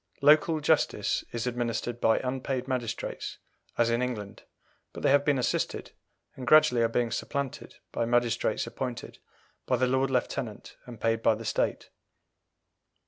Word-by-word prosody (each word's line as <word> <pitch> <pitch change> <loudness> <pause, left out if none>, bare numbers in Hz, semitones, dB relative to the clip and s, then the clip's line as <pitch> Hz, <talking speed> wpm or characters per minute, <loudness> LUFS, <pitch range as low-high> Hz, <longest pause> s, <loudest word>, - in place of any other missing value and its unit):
Local 155 +2 +5
justice 145 - +1
is 115 0 -3
administered 120 -1 -2
by 110 - +4
unpaid 130 0 -2
magistrates 120 -3 -4 0.4
as 115 0 +3
in 120 +1 +1
England, 110 -6 -4 0.5
but - - -8
they - - +4
have 140 0 +5
been 145 -1 +2
assisted, 125 - -1 0.4
and 125 -2 -8
gradually 150 -4 +6
are 115 - +4
being 115 0 0
supplanted, 140 -2 -4 0.2
by 115 - -1
magistrates 120 -1 +1
appointed 125 -2 -6 0.5
by 125 - +2
the 130 - +2
Lord 130 +1 +1
Lieutenant 125 -3 -3
and 120 -3 -9
paid 115 0 +1
by 110 - +4
the 115 +1 -8
State. - - -1
125 Hz, 145 wpm, -28 LUFS, 115-135 Hz, 0.5 s, gradually